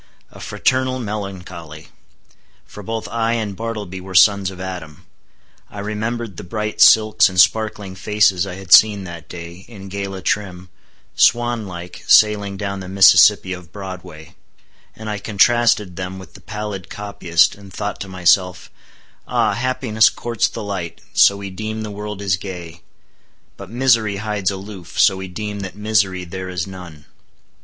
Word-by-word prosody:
A - - -14
fraternal 130 0 0
melancholy! 95 - -7 0.8
For 105 - -11
both 110 +1 -4
I 115 +1 0
and 110 -4 -3
Bartleby 105 -4 -5
were 95 0 -9
sons 100 0 +5
of 95 -1 -11
Adam. 90 -5 -8 0.6
I - - -12
remembered 110 0 -4
the - - -7
bright 105 +3 -4
silks 110 -1 +6
and 90 -1 -2
sparkling 105 -1 +2
faces 100 -1 +1
I 90 - -6
had 95 -2 0
seen 105 -2 +7
that 85 -2 -10
day, 85 +1 -9
in 100 -4 -11
gala 95 -1 -5
trim, 95 -3 -2 0.5
swan 120 -2 +2
like 90 -1 -9
sailing 105 -2 +4
down 100 -1 -4
the 95 -1 -8
Mississippi 95 0 +6
of 90 -3 -10
Broadway; 90 -5 -9 0.6
and 110 - -9
I 105 -1 -3
contrasted 105 -2 +2
them 95 0 -5
with 95 -4 -12
the - - -15
pallid 105 -4 -6
copyist, 95 -5 +1
and 100 -1 -14
thought 105 +2 -4
to 100 - -5
myself, 90 0 +1 0.6
Ah, 105 - +1
happiness 125 -1 +2
courts 115 -2 -1
the 115 - -7
light, 95 -4 -5
so 100 - +5
we 100 -1 -7
deem 110 +3 -5
the 105 - -6
world 105 0 -6
is 95 -3 +1
gay; 90 -3 -8 0.7
but 100 -2 -11
misery 115 -4 +2
hides 105 -2 -2
aloof, 95 -2 -8
so 95 -3 +5
we 95 0 -6
deem 105 +2 -5
that 95 -2 -6
misery 105 -3 0
there 95 +1 -7
is 90 -2 -3
none. 90 -6 -11
100 Hz, 155 wpm, -19 LUFS, 90-105 Hz, 0.8 s, seen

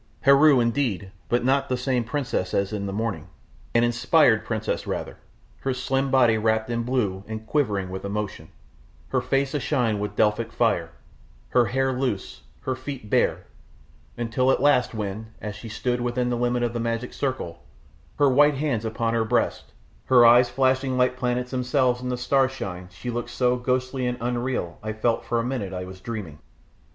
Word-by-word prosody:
Heru, 140 0 +6
indeed, 115 -6 0 0.2
but 120 0 +1
not 135 +1 +2
the 125 - 0
same 125 -1 0
princess 115 -6 -2
as 100 +1 0
in 100 -1 -3
the - - -3
morning; 110 +1 -3 0.5
an 115 - +5
inspired 120 0 +3
priestess 110 -2 -3
rather, - - -4 0.4
her 135 -1 -2
slim 135 +2 0
body 120 -4 +4
wrapped 110 +1 +1
in 115 0 0
blue 115 -6 -1
and 110 0 -6
quivering 105 -9 0
with 95 - -5
emotion, 105 0 -4 0.6
her - - +1
face 135 0 0
ashine 125 -7 0
with 105 0 -4
Delphic 110 +2 +1
fire, 115 -8 +1 0.6
her 125 -1 +4
hair 135 +2 0
loose, 125 -6 -3 0.2
her 130 - -2
feet 130 -4 -7
bare, - - +2 0.7
until 120 +2 0
at - - +2
last 125 -4 +3
when, 110 +1 -5
as 105 -1 -6
she 110 +2 -9
stood 120 +3 -1
within 120 0 -1
the - - +1
limit 120 0 0
of 120 -1 -1
the 120 - -2
magic 115 +1 -2
circle, 130 -11 -3 0.6
her 145 - +4
white 145 +2 +5
hands 135 -6 -1
upon 115 +1 -1
her 115 -1 +2
breast, 115 +2 -1 0.3
her 125 -2 +6
eyes 120 +1 +7
flashing 130 +1 +1
like 125 0 +2
planets 125 0 -2
themselves 125 -1 +1
in 125 - -4
the 125 - -1
starshine 125 -8 -1
she 90 +7 -6
looked 120 0 -4
so 125 0 +1
ghostly 130 +1 -1
and 125 0 -2
unreal 120 -6 -2
I 110 0 -4
felt 115 +2 0
for 120 - 0
a - - 0
minute 120 -7 -3
I 90 0 -4
was 95 0 -11
dreaming. 100 -10 -6
120 Hz, 180 wpm, -24 LUFS, 110-130 Hz, 0.7 s, eyes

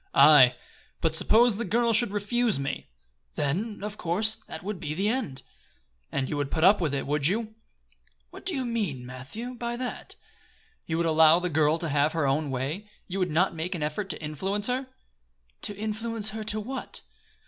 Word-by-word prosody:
"Aye, 140 -3 +8 0.4
but - - +1
suppose 230 -1 +4
the 235 - -2
girl 235 +3 +2
should 220 0 +4
refuse 210 - 0
me?" 135 0 -4 0.5
"Then, 200 +9 -2
of 210 0 -5
course, 215 +6 +1
that 160 - -8
would 205 -1 -4
be 150 -1 -4
the 195 +4 0
end." 185 - -2 0.7
"And 135 -1 -1
you 150 - -3
would 145 -1 -1
put 160 +1 -1
up 195 +2 +6
with 150 -4 0
it, 135 - -2
would 145 0 +1
you?" 220 +4 -1 0.8
"What - - -11
do 370 - -1
you 265 -2 -1
mean, 200 - -2
Matthew, 140 - -7
by 240 -1 -4
that?" 250 0 -5 0.7
"You 160 - -1
would 170 - +1
allow 160 0 +6
the 180 0 -1
girl 155 +1 +3
to 165 -1 -3
have 145 +2 +2
her 160 -3 0
own 140 +2 +1
way? 145 +11 -3 0.2
You 195 +1 -3
would 180 -1 +1
not 170 +5 +2
make 170 +3 -3
an 160 - -3
effort 155 +7 -3
to 160 -1 -5
influence 190 +8 -2
her?" 255 +2 0 0.7
"To 205 - -3
influence 220 0 -3
her 220 0 -5
to 215 0 0
what?" 260 +6 -4
185 Hz, 190 wpm, -27 LUFS, 150-220 Hz, 0.8 s, Aye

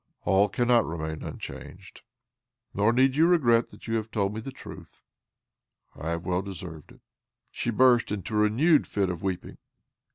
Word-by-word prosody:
"All 100 +1 +3
cannot 120 +1 +3
remain 80 -1 -5
un - - -7
changed. - - -10 0.7
Nor 105 +3 +2
need 130 +2 +3
you 160 +3 +4
regret 120 -10 +3
that - - -15
you 115 - -2
have 110 0 -4
told 100 -2 -1
me 110 - -5
the 135 - -7
truth. - - -12 1.0
I 80 - -5
have 85 +1 -3
well 90 0 0
deserved 90 -5 -9
it." - - -22 0.5
She - - -3
burst 120 0 +4
into 105 +1 -4
a 105 - +2
renewed 135 +10 +3
fit 100 -3 -1
of 85 -1 -6
weeping. 95 -2 -4
105 Hz, 170 wpm, -27 LUFS, 95-120 Hz, 1.0 s, you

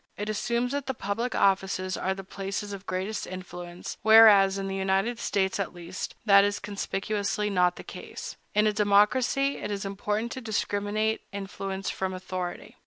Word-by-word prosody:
It 210 +1 -3
assumes 235 +3 0
that 285 -1 -3
the 265 - -2
public 225 +4 -2
offices 190 -1 +1
are 190 0 -1
the 195 - -7
places 195 +2 -5
of 200 0 -9
greatest 190 +4 -3
influence; 175 -1 -7
whereas, 210 -3 +7
in 195 0 -3
the 195 - -3
United 195 +5 0
States, 190 -2 0
at 195 -2 -3
least, 175 +1 -6
that 200 -2 +7
is 205 0 +1
conspicuously 205 0 -2
not 180 -2 +3
the - - -9
case. - - -8 0.2
In 210 +1 +4
a 215 - +3
democracy, 215 +7 +3
it - - -5
is 200 -1 -3
important 210 +3 -2
to 260 - -5
discriminate 215 0 -1
influence 195 -1 -4
from 190 -1 -3
authority. 185 +4 -5
200 Hz, 170 wpm, -27 LUFS, 190-215 Hz, 0.2 s, whereas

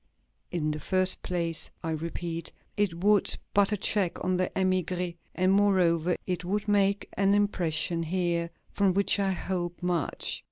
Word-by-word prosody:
In 155 -3 -1
the 150 - -4
first 185 +4 +1
place, 170 -3 -2
I 165 - -2
repeat, 165 +1 -4 0.2
it 190 -4 -1
would 205 0 +3 0.2
put 200 +1 +4
a 210 - +1
check 195 -2 0
on 185 0 +1
the 185 0 0
émigrés, 180 -2 0 0.2
and, 185 +1 +3
moreover, 180 -4 +3
it 180 -1 -2
would 200 +4 -2
make 200 -1 +2
an 200 0 +3
impression 170 -5 0
here 170 0 0 0.2
from 195 -2 +2
which 200 +1 +2
I 195 -1 +1
hope 175 -1 -3
much. 175 -4 -1
180 Hz, 155 wpm, -28 LUFS, 170-195 Hz, 0.2 s, put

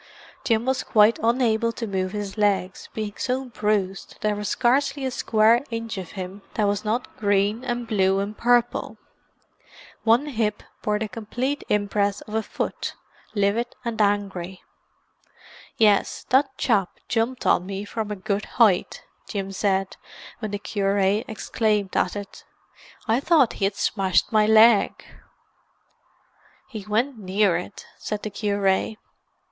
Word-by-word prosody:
Jim 230 -1 +1
was 260 0 +1
quite 215 +1 +4
unable 230 -1 +2
to 230 0 -5
move 190 -3 -2
his 205 -2 -5
legs, 200 -3 0
being 215 -2 -3
so 260 +1 -1
bruised 210 -5 -2
that - - -24
there 210 -1 +1
was 205 -1 -3
scarcely 275 +2 +1
a 260 - -1
square 230 +1 +3
inch 230 -1 -4
of 180 - -8
him 190 +1 -7
that 215 - +1
was 205 +1 -1
not 225 +4 -2
green 205 +3 +1
and 240 -1 -2
blue 195 -4 +2
and 200 +2 -2
purple. 240 +1 +1 1.1
One 230 +5 +4
hip 220 -7 -2 0.2
bore 210 0 0
the 220 +1 -2
complete 245 +6 -3
impress 205 -1 0
of 215 - -11
a 220 - +1
foot, - - -4 0.4
livid 205 +4 0
and 230 -2 -1
angry. 195 -3 -1 1.1
"Yes, 210 -3 +3
that 275 +2 +4
chap 205 -8 0
jumped 235 +3 -1
on 180 - +3
me 200 +1 -4
from 215 0 -4
a 210 - -3
good 200 +2 -2
height," 215 -7 +3 0.2
Jim 195 -2 -4
said 195 -1 0 0.4
when 215 -3 -4
the 205 - -3
cure 200 -1 -1
exclaimed 210 0 0
at 180 - +1
it. 205 -1 -8 0.6
"I 225 +3 +3
thought 290 -4 +3
he 195 - -1
had 195 0 -1
smashed 190 -4 +1
my 215 -1 +4
leg." 220 -1 +5 1.6
"He 215 -5 -8
went 235 +4 0
near 195 -1 +2
it," 180 +3 -6
said 210 -1 -4
the 215 - -4
cure. 200 -1 0
210 Hz, 145 wpm, -24 LUFS, 200-230 Hz, 1.6 s, leg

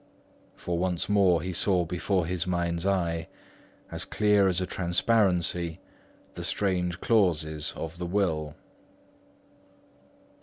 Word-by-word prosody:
For 85 -1 -3
once 90 -2 -1
more 95 -5 +3
he 90 0 -3
saw 90 0 +1
before 90 +1 -1
his 90 0 -2
mind's 85 0 -1
eye, 85 -4 0 0.6
as - - -4
clear 105 -1 +3
as 90 -2 0
transparency, 90 -2 +1 0.5
the - - -7
strange 90 -3 -1
clauses 80 -9 +1
of 80 +1 -6
the 90 - -3
will. 80 -6 -1
90 Hz, 110 wpm, -27 LUFS, 85-95 Hz, 0.6 s, more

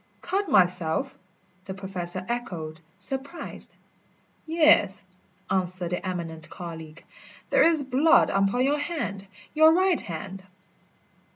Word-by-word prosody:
"Cut 385 +1 -2
myself?" 180 - +2 0.5
the 190 - -6
Professor 185 -2 -4
echoed, 170 -10 -4 0.2
surprised. 270 - -5 0.8
"Yes," 320 -1 +4 0.4
answered 180 -2 -2
the 180 - -2
eminent 165 -4 -5
colleague, 165 -2 -9 0.5
"there - - +4
is 325 -3 +4
blood 285 +6 +4
upon 195 +6 +2
your 290 +2 +1
hand 290 - -4 0.3
your 315 +1 +6
right 370 0 +3
hand." 190 +2 -7
195 Hz, 105 wpm, -26 LUFS, 175-295 Hz, 0.8 s, your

